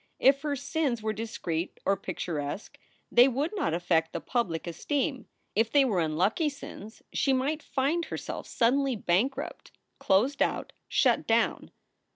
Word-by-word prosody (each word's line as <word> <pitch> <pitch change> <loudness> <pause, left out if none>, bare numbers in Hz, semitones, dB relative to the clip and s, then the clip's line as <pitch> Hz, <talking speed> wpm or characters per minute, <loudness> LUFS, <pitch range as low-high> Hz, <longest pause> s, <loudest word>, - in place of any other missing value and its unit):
If 275 +1 +4
her 295 -1 -1
sins 280 -4 -1
were 215 0 0
discreet 185 -6 -4
or 195 - +3
picturesque 155 -1 -5 0.3
they 245 +2 +7
would 275 +5 -1
not 270 - 0
affect 170 -2 +1
the - - -2
public 195 -10 -1
esteem. 265 - -2 0.3
If 225 +2 +2
they 285 -2 +5
were 210 -8 +1
unlucky 180 - +1
sins, 220 -6 -10
she 270 - +2
might 285 +4 0
find 290 +6 0
herself - - -5
suddenly 265 +2 +2
bankrupt, 240 - -1 0.3
closed 240 +9 +2
out, - - 0
shut - - +2
down. - - +1
240 Hz, 145 wpm, -28 LUFS, 185-280 Hz, 0.3 s, they